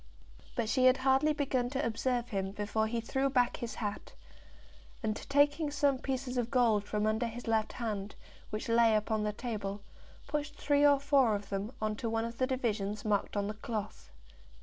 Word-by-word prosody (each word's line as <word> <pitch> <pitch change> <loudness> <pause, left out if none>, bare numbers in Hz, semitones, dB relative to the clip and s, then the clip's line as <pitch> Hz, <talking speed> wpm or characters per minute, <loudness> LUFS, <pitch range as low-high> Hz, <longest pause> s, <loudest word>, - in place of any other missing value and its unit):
But 235 -2 0
she 255 +3 +2
had 255 +1 +6
hardly 265 +3 +3
begun 270 -4 0
to 270 +2 -1
observe 240 +1 -1
him 195 -3 -2
before 215 +1 -1
he 235 +1 -1
threw 265 +4 0
back 250 -3 +2
his 235 -2 -5
hat, 205 -2 -5 0.9
and 215 -1 0
taking 290 +2 +3
some 285 -2 +1
pieces 260 -1 -3
of 235 -1 -1
gold 230 -6 +3
from 210 0 -1
under 220 +2 +1
his 235 +2 -7
left 220 -2 0
hand, 210 -4 -4 0.3
which 215 +4 -4
lay 230 -1 +4
upon 215 0 0
the 210 0 0
table, 205 -3 -4 0.4
pushed 295 -1 -3
three 290 0 +2
or 285 -1 +6
four 275 -6 +3
of 200 -1 -6
them 200 +3 -3
on 215 0 -1
to 230 - -2
one 225 0 0
of 230 0 -7
the 255 - +2
divisions 215 -6 -2
marked 205 0 0
on 200 - +1
the 210 - -3
cloth. 210 - -5
230 Hz, 190 wpm, -32 LUFS, 215-265 Hz, 0.9 s, had